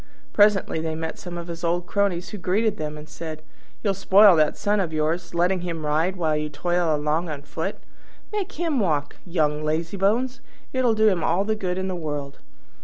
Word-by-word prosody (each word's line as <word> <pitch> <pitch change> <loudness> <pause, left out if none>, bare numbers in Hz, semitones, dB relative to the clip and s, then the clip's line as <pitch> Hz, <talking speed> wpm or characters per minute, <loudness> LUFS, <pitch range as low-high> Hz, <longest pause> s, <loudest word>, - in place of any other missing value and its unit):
Presently 205 -5 +4
they 160 0 -2
met 160 0 -5
some 175 -1 -7
of 170 - -5
his 170 0 -7
old 175 +1 0
cronies, 190 -2 0
who 210 - -7
greeted 210 +4 +1
them 150 -2 -4
and 150 0 -10
said, 155 -1 -7 0.4
"You'll 200 -3 +2
spoil 195 0 +6
that 155 -1 +2
Son 205 0 +1
of 175 -5 -1
yours, 160 +3 -1
letting 180 +2 +2
him 165 -3 -4
ride 160 +5 +1
while 160 -4 0
you 150 0 -2
toil 175 +1 0
along 155 +3 0
on 145 -2 -5
foot! 145 - -4 0.5
Make 415 -4 -3
him 325 -4 0
walk, 155 -8 0
young 155 -3 0
lazybones! 200 - 0 0.3
It'll 250 -3 +2
do 220 0 +4
him 185 -6 +2
all 190 - +2
the 220 - +1
good 185 -4 -2
in 190 0 -2
the 185 - -2
world." 145 -4 -5
175 Hz, 195 wpm, -24 LUFS, 155-200 Hz, 0.5 s, spoil